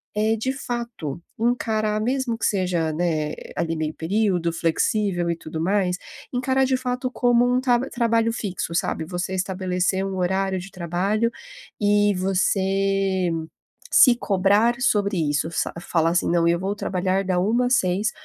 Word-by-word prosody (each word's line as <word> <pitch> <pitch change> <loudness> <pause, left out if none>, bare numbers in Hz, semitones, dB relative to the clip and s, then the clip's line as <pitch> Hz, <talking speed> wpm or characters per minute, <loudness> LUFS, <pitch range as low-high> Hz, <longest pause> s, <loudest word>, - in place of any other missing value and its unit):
é 215 +1 +2
de 225 +4 -2
fato, 235 - -5 0.2
encarar 220 -2 0
mesmo 250 0 -1
que - - -2
seja, 180 -5 0
né, 155 -2 -1 0.2
ali 165 -1 -1
meio 155 -1 -2
período 180 -1 0
flexível 175 +2 0
e 170 - 0
tudo 160 -1 -6
mais, 185 0 +1 0.4
encarar 260 +1 +1
de 260 0 +1
fato 255 0 -3
como 245 -1 +3
um 250 +1 +2
tab 245 -1 +2
trabalho 230 -1 +1
fixo, 185 -6 -4
sabe? 165 -1 -1
Você 180 +2 -3
estabelecer 185 0 -1
um 195 -1 -4
horário 190 +1 0
de 185 +2 -10
trabalho 190 +6 -1 0.5
e 205 0 +3
você 195 0 +1 0.6
se 250 -4 +7
cobrar 205 +2 +2
sobre 205 -5 +1
isso 150 +2 0
sa - - -1
falar 165 -1 +1
assim: 175 - +1
"Não, 170 -1 +3
eu 170 0 +2
vou 195 +2 -2
trabalhar 190 -1 -1
da 185 -1 0
13h 230 +7 +2
às 250 - +4
18h 195 +2 +1
195 Hz, 155 wpm, -23 LUFS, 175-230 Hz, 0.6 s, se